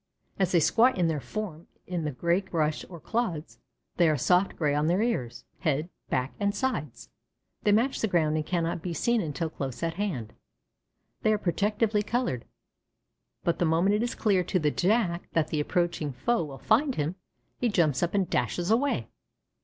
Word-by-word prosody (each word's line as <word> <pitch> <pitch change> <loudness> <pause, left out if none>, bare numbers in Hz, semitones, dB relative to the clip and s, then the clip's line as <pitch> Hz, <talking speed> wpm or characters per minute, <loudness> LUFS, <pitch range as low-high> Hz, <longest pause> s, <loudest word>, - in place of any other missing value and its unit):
As 190 -2 +2
they 175 - +5
squat 235 - +4
in 175 -2 +3
their 155 -2 -1
form 165 - -6 0.2
in 175 -3 -3
the 150 - -1
gray 170 +7 +1
brush 155 -5 -1
or 170 -2 -9
clods, 180 -5 -3 0.4
they 170 -2 +5
are 155 - +2
soft 180 +8 +2
gray 150 -3 +1
on 150 +1 +1
their 180 +6 +2
ears, 130 - -2
head, 155 +2 0 0.2
back, 130 +1 -1
and 200 0 0
sides; 155 - -3 0.5
they 210 - +3
match 235 +6 +2
the 220 - +2
ground 160 -5 +2
and 155 - 0
cannot 170 0 -1
be 175 -1 -4
seen 235 +7 +2
until 160 -1 -3
close 135 -2 -5
at 165 0 0
hand 130 - -3 0.9
they 215 - +3
are 215 - +3
protectively 210 +3 +1
colored. 225 - -1 1.0
But 170 - 0
the 175 - +3
moment 170 +5 +3
it 210 - +2
is 240 - -1
clear 195 -4 +2
to 185 - 0
the 150 -4 +1
Jack 180 -2 +1
that 155 -2 +1
the 155 - -1
approaching 170 -2 0
foe 170 - 0
will 140 -2 -8
find 250 - +2
him, 150 +3 -1 0.5
he 245 - +2
jumps 155 -10 +2
up 175 +3 0
and 195 -3 +2
dashes 170 - 0
away. 275 +5 +1
175 Hz, 185 wpm, -28 LUFS, 155-210 Hz, 1.0 s, they